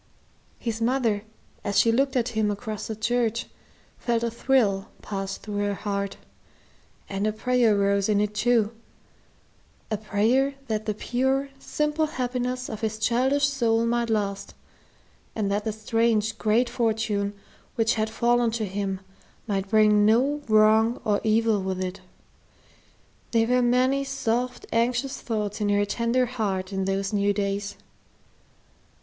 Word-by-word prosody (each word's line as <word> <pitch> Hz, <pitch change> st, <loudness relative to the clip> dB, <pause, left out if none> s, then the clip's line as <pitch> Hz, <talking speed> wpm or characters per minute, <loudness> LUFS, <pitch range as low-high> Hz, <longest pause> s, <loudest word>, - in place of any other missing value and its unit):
His 230 Hz, -1 st, -4 dB
mother, 230 Hz, -4 st, +1 dB, 0.4 s
as 200 Hz, -1 st, -1 dB
she 230 Hz, -, +5 dB
looked 270 Hz, +3 st, +1 dB
at 245 Hz, -1 st, +1 dB
him 220 Hz, -3 st, 0 dB
across 210 Hz, 0 st, -4 dB
the 220 Hz, -, -4 dB
church, 230 Hz, +1 st, 0 dB, 0.5 s
felt 235 Hz, -1 st, 0 dB
a 235 Hz, -, 0 dB
thrill 225 Hz, -5 st, +1 dB, 0.2 s
pass 195 Hz, -1 st, -4 dB
through 205 Hz, -1 st, -6 dB
her 205 Hz, 0 st, 0 dB
heart, 200 Hz, -1 st, -3 dB, 0.9 s
and 200 Hz, +1 st, -1 dB
a -, -, +2 dB
prayer 230 Hz, -1 st, +2 dB
rose 200 Hz, 0 st, +2 dB
in 205 Hz, -1 st, +3 dB
it 210 Hz, 0 st, 0 dB
too, 230 Hz, -1 st, +2 dB, 1.2 s
a 215 Hz, -, +1 dB
prayer 225 Hz, +7 st, +1 dB
that 215 Hz, -1 st, -2 dB
the 215 Hz, -, 0 dB
pure, 265 Hz, +5 st, 0 dB
simple 300 Hz, +2 st, 0 dB
happiness 250 Hz, -2 st, -2 dB
of 220 Hz, 0 st, -6 dB
his 220 Hz, -1 st, -2 dB
childish 255 Hz, +5 st, +2 dB
soul 230 Hz, -5 st, +1 dB
might 235 Hz, 0 st, 0 dB
last, 200 Hz, -3 st, -2 dB, 0.8 s
and 205 Hz, -3 st, -1 dB
that 205 Hz, +1 st, -1 dB
the 220 Hz, -, 0 dB
strange, 220 Hz, 0 st, +1 dB
great 225 Hz, +3 st, +2 dB
fortune 220 Hz, -4 st, -1 dB, 0.4 s
which 225 Hz, 0 st, +2 dB
had 220 Hz, -1 st, -1 dB
fallen 235 Hz, +1 st, +2 dB
to 225 Hz, -1 st, -2 dB
him 195 Hz, -1 st, -3 dB, 0.4 s
might 195 Hz, -2 st, -2 dB
bring 210 Hz, -1 st, +5 dB
no 260 Hz, +8 st, +3 dB
wrong 220 Hz, +2 st, +4 dB
or 205 Hz, -1 st, +1 dB
evil 220 Hz, -1 st, +2 dB
with 190 Hz, -1 st, -3 dB
it. 185 Hz, +1 st, -4 dB, 1.3 s
There 225 Hz, -1 st, +4 dB
were 250 Hz, +2 st, +2 dB
many 255 Hz, +3 st, +2 dB
soft, 250 Hz, -2 st, -2 dB
anxious 245 Hz, +4 st, 0 dB
thoughts 215 Hz, -2 st, -3 dB
in 205 Hz, -, +1 dB
her 205 Hz, 0 st, +3 dB
tender 235 Hz, +4 st, +1 dB
heart 200 Hz, -6 st, -3 dB
in 190 Hz, 0 st, -1 dB
those 195 Hz, +1 st, -1 dB
new 205 Hz, 0 st, +2 dB
days. 200 Hz, 0 st, -2 dB
220 Hz, 145 wpm, -25 LUFS, 205-240 Hz, 1.3 s, she